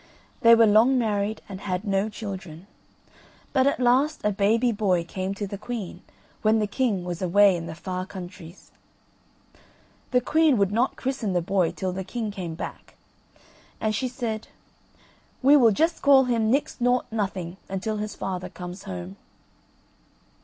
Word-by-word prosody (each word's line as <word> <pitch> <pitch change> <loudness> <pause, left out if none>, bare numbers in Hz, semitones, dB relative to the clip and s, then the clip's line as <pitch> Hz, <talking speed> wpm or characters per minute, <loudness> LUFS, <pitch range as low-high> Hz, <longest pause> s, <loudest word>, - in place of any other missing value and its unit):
They 230 -3 +7
were 230 0 +6
long 225 +5 +5
married 210 -2 -1
and 195 -1 -8
had 185 +1 -3
no 200 +1 0
children; 190 -6 -7 0.9
but 265 -1 +3
at 280 - +1
last 260 +5 +2
a 210 - +2
baby 220 +5 +2
boy 195 -5 +1
came 185 +3 -4
to 205 - -3
the 200 0 -7
queen 215 -6 -6 0.4
when 215 +1 +3
the 215 - +1
king 205 -4 -1
was 175 0 -5
away 195 +1 +5
in 165 -1 -5
the 160 - -7
far 185 +2 -5
countries. 180 -2 -10 1.4
The 250 - +3
queen 305 +1 +3
would 200 -1 +2
not 235 +5 +1
christen 255 -7 -2
the 175 - +1
boy 185 -2 +1
till 185 -1 -3
the 190 +1 -4
king 220 +2 -4
came 180 -5 -6
back, - - -8 0.8
and 215 -1 0
she 255 +5 -1
said, 235 -4 -4 1.0
"We 280 +3 +7
will 245 -6 +6
just 325 +9 +1
call 275 -1 +6
him 230 -3 +1
Nix 270 0 0
Nought 245 +1 +2
Nothing 190 -5 -3
until 205 +3 -3
his 210 0 -4
father 185 -1 -4
comes 180 +1 -9
home." 90 +1 -7
205 Hz, 160 wpm, -25 LUFS, 185-240 Hz, 1.4 s, They